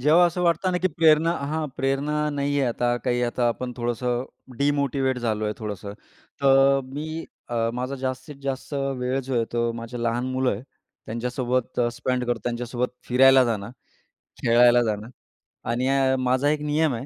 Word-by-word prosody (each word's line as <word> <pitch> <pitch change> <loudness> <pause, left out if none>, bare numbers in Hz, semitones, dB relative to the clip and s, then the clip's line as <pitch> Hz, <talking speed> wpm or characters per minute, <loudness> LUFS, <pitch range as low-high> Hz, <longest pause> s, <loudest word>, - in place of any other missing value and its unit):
जेव्हा 155 +6 +5
असं 180 +1 -2
वाटतं 170 +2 +2
ना, 180 - +1
की 185 - +3
प्रेरणा 160 0 +4
हां, 155 +2 -2
प्रेरणा 145 +3 0
नाही 145 0 -1
आहे 130 - +2
आता 120 +1 0
काही, 125 -1 +1
आता 120 0 0
आपण 125 +2 -3
थोडंसं 120 +1 -1 0.3
डिमोटिवेट 140 -2 +1
झालो 110 -3 -1
आहे 105 - 0
थोडंसं, 105 -2 -6 0.5
तर 135 0 +5
मी 155 +5 -5 0.2
अ, 120 - -3 0.2
माझा 125 +2 -3
जास्तीत 130 +3 -4
जास्त 135 +1 -4 0.3
वेळ 125 +2 -1
जो 130 +1 -4
आहे, 115 -1 +2
तो 120 0 +1
माझ्या 115 +1 -6
लहान 120 +2 0
मुलं 130 0 +1
आहे 100 - -5 0.4
त्यांच्यासोबत 125 +2 -2
अ, 120 - +3
स्पेंड 125 +1 -1
करतो, 120 -2 -1
त्यांच्यासोबत 120 +1 -2 0.2
फिरायला 130 +1 +6
जाणं, 105 -3 -2 0.7
खेळायला 120 +1 +6
जाणं 110 0 -3 0.6
आणि 125 +2 0
अ, 135 -1 +3
माझा 130 +3 +2
एक 150 0 0
नियम 150 -1 +1
आहे, 115 +3 -5
130 Hz, 170 wpm, -24 LUFS, 120-140 Hz, 0.7 s, फिरायला